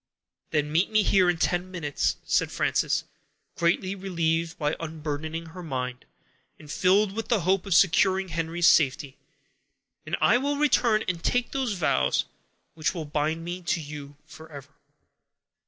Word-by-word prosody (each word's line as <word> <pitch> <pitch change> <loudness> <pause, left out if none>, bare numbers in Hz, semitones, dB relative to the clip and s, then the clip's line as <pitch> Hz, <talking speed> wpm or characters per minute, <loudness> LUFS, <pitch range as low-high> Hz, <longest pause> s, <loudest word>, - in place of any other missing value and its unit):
"Then 150 -1 0
meet 165 +5 +2
me 215 -1 +3
here, 185 -2 +4
in 175 - +1
ten 175 +2 0
minutes," 165 -6 -1
said - - +1
Frances, - - 0 0.5
greatly 170 +3 +1
relieved 170 -3 -1
by 150 0 -1
unburdening 160 0 -5
her 180 +3 -9
mind, 125 -5 -4 0.5
and 150 -1 -11
filled 190 +4 +3
with 220 +2 -5
the 230 -5 +1
hope 190 +3 +1
of 190 - +2
securing 190 +1 +3
Henry's 165 +1 0
safety, 140 -2 +3 0.9
"and - - -3
I 245 - +4
will 285 +2 -1
return 240 -7 +3
and 170 -2 -3
take 245 0 0
those 265 -5 -1
vows 160 - +1 0.5
which 160 +2 -2
will 165 -3 -4
bind 155 +3 -2
me 175 +1 -5
to 170 0 -1
you 145 -2 -9
forever." 150 -3 -12
170 Hz, 150 wpm, -26 LUFS, 155-190 Hz, 0.9 s, here